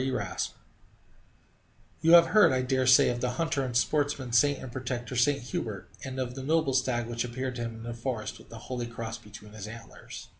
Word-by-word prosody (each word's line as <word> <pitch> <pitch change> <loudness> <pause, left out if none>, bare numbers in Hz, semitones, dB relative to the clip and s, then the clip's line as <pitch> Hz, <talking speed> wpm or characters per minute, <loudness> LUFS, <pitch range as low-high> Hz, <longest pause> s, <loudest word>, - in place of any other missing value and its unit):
E. 135 - 0
Raspe - - -3 1.5
You 165 +1 +5
have 170 -1 +9
heard, 210 +5 +6
I 130 -1 +1
dare 130 0 +1
say, 130 - +7
of 120 0 -2
the 125 -1 0
hunter 160 -4 0
and 125 -2 -1
sportsman's 140 -3 0
saint 145 +3 +4
and 130 - -8
protector, 125 0 -4
St. 140 +4 +3
Hubert, 105 -5 -5
and 130 0 -5
of 125 -1 -2
the 135 - -6
noble 155 0 +1
stag 130 -2 +1
which 120 0 -2
appeared 130 +1 -4
to - - -4
him 115 -1 -4
in 115 - -10
the 120 0 -5
forest 115 -1 -4
with - - -17
the 115 - -9
holy 120 +1 -5
cross 115 0 -6
between 105 0 -13
his 105 -1 -7
antlers. 115 +1 -10
125 Hz, 215 wpm, -29 LUFS, 115-135 Hz, 1.5 s, have